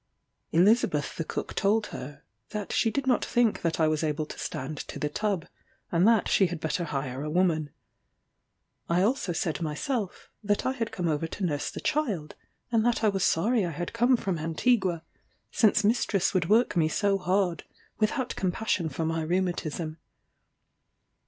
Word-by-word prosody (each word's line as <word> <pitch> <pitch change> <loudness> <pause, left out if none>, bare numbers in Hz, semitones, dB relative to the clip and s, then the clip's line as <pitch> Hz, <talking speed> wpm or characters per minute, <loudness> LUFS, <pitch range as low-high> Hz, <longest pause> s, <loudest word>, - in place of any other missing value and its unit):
Elizabeth 185 - +3
the 165 - -2
cook - - -4
told 210 +2 +2
her, 140 +3 -8 0.3
that 210 -2 -4
she 225 - +2
did 275 +4 -2
not 255 -2 +2
think 240 -3 +1
that 165 -1 -1
I 160 - +4
was 155 0 0
able 155 0 -1
to - - -9
stand 140 +4 -4
to - - -7
the 150 - -1
tub, 200 0 -1 0.5
and 175 +4 +4
that 230 -2 +4
she 190 - +4
had 175 -2 -5
better 160 +2 -1
hire 135 -3 -3
a 150 - -3
woman. 160 -3 +1 1.2
I 175 +2 +3
also 225 -3 +1
said 165 -1 -2
myself, 185 - -3
that 205 0 0
I 260 - +2
had 230 -4 -3
come 180 -6 -2
over 155 0 0
to 190 +4 -3
nurse 145 -4 -1
the - - -7
child, 225 - -1 0.4
and 225 -2 +3
that 235 -1 +1
I 215 - +5
was 195 -2 -1
sorry 220 +6 +2
I 175 - -1
had 170 +2 -5
come 240 +2 +4
from 190 -7 -2
Antigua, 170 +1 +1 0.5
since 220 -1 +3
mistress 205 -3 +2
would 175 -3 +1
work 230 +4 +4
me 160 -2 +3
so 200 +2 +1
hard, 185 -2 0 0.4
without 240 +4 0
compassion 185 -2 -1
for 155 +3 -3
my 165 0 -1
rheumatism. 165 -2 -2
180 Hz, 175 wpm, -28 LUFS, 160-220 Hz, 1.2 s, I